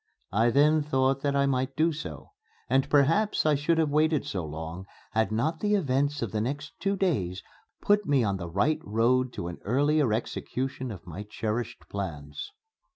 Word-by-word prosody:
I 115 +4 +3
then 150 +5 +4
thought 135 -2 +1
that 140 0 0
I 140 0 +3
might 130 0 0
do 160 +2 +3
so. 160 - -8 0.4
And 135 +1 +2
perhaps 160 +11 +3
I 155 - +4
should 150 +4 +1
have 160 -3 +2
waited 155 0 +2
so 115 -12 -3
long, 80 +4 -6 0.2
had 110 -2 +1
not 150 +9 0
the 210 0 +2
events 140 -5 0
of 115 - -3
the 110 - -1
next 145 +5 -3
two 195 0 0
days 100 - -1 0.4
put 205 0 +3
me 140 -4 +3
on 100 -3 0
the 85 -2 -6
right 105 - +1
road 120 +4 +2
to 85 - -4
an 85 - -7
earlier 145 +3 +2
execution 130 +3 -3
of 95 -7 -8
my 90 +3 -7
cherished 110 +2 -4
plans. 80 - -5
130 Hz, 180 wpm, -28 LUFS, 105-150 Hz, 0.4 s, then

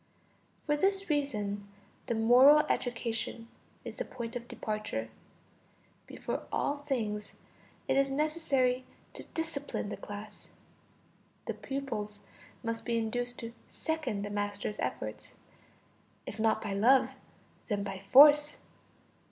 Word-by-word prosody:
For 295 - +2
this 390 +2 +1
reason 210 -9 -1 0.4
the 235 - 0
moral 250 +7 +7
education 230 -3 -2 0.4
is - - -7
the - - -1
point 235 - -6
of 240 0 -5
departure; 210 - -3 1.0
before - - -4
all 285 - 0
things, 225 -8 -3 0.5
it - - +2
is 275 0 +3
necessary 275 -4 +1 0.3
to - - -7
discipline 290 -9 -3
the - - -5
class. 205 +1 -9 1.0
The - - -2
pupils 220 -7 -4 0.4
must 230 -1 -2
be 235 -1 0
induced 245 +2 -2
to 230 0 -6 0.2
second 310 -11 -2
the 205 - -5
master's 205 0 -2
efforts, - - -4 0.9
if 210 - -7
not 220 0 +2
by 205 -2 -2
love, 245 +7 +5 0.6
then 205 -3 -1
by 195 -1 -5
force. 295 +8 +7
235 Hz, 120 wpm, -31 LUFS, 210-280 Hz, 1.0 s, moral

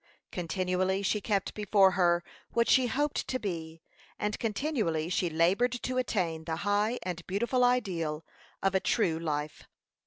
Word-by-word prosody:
Continually 185 +2 -1
she 210 +1 +1
kept 200 -2 -1
before 200 -2 +4
her 175 -2 +2 0.3
what 235 0 +2
she 255 -1 +5
hoped 290 +4 -1
to 260 - -1
be, 165 -7 -5 0.3
and 210 0 -2
continually 215 - -1
she 180 -1 0
labored 180 +10 +2
to 255 +1 -2
attain 170 -10 -1
the 160 - -2
high 205 +4 +2
and 175 -2 -4
beautiful 235 +6 +1
ideal 180 -11 0 0.4
of 195 0 +2
a 190 - +3
true 175 -6 +1
life. 150 -2 -3
190 Hz, 150 wpm, -30 LUFS, 170-225 Hz, 0.4 s, she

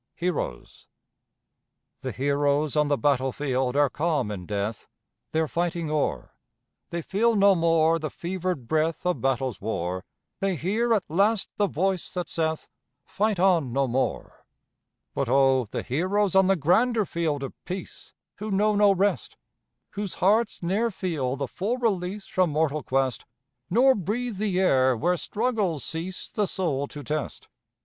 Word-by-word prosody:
HEROES. 170 - -4 1.1
The - - -3
heroes 145 +2 +1
on 150 -1 +3
the 145 -1 +1
battlefield 130 -2 0
are 145 0 +4
calm 145 -5 -1
in 90 -4 -6
death, 105 +2 -3 0.4
Their 160 0 +1
fighting 170 -1 -2
o'er; 150 -2 -1 0.6
They 170 -1 -4
feel 225 +6 +2
no 200 -1 +6
more 165 -1 +3
the 155 -1 -3
fevered 175 -5 -4
breath 160 +4 0
Of 180 -1 0
battle's 130 -4 -1
war; 95 -3 -3 0.4
They 195 -1 0
hear 210 - 0
at 200 - 0
last 200 +6 +2
the 205 - +2
voice 185 +2 -1
that 180 -1 -2
saith 160 -1 -2 0.4
"Fight 210 -2 0
on 175 -8 +3
no 135 +2 +1
more." 130 +2 -2 0.7
But 135 - -1
oh, 135 -1 +4
the 105 - -5
heroes 185 +8 0
on 190 -1 +5
the 195 - +4
grander 215 - +2
field 160 -5 -2
of 135 - -5
peace, 185 +1 -7 0.3
Who 215 +2 -5
know 210 +1 +2
no 205 0 +5
rest! 200 +2 0 0.5
Whose 205 -2 -4
hearts 210 +1 +2
ne'er 205 +7 +1
feel 160 - -2
the 140 0 -3
full 205 - -2
release 200 -4 -1
From 185 -2 +1
mortal 155 0 0
quest, 135 -2 -1 0.5
Nor 255 +7 +5
breathe 220 +2 -3
the 195 -3 0
air 130 -8 +3
where 175 +9 +1
struggles 205 - -1
cease 170 +3 -4
The 205 -2 -1
soul 145 -8 -1
to 145 0 -9
test. 150 +2 -4
170 Hz, 150 wpm, -26 LUFS, 140-195 Hz, 1.1 s, no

